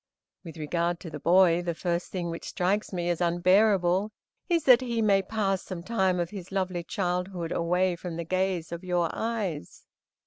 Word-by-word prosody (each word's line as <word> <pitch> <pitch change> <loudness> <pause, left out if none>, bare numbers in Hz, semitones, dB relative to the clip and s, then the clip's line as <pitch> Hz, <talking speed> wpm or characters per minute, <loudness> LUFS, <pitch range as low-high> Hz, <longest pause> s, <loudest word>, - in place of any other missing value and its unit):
With 165 -2 -10
regard 170 +3 -1
to 165 - -8
the 150 - -6
boy, 175 +1 +4
the 170 -1 -3
first 175 0 -2
thing 175 -3 -3
which 165 - -7
strikes 195 +4 -1
me 175 -2 -2
as 175 - -3
unbearable 185 +2 +3 0.4
is 335 -3 +2
that 255 -3 +7
he 235 -2 -2
may 200 -3 +4
pass 195 -1 -1
some 180 -3 -7
time 190 -4 +1
of 175 -1 -2
his 190 -3 -8
lovely 185 -3 -2
childhood 180 -2 -2
away 180 +2 +1
from 170 -1 -6
the 170 0 -4
gaze 185 -2 -1
of 170 +1 -6
your 175 -2 0
eyes. 210 - -4
180 Hz, 180 wpm, -27 LUFS, 170-195 Hz, 0.4 s, that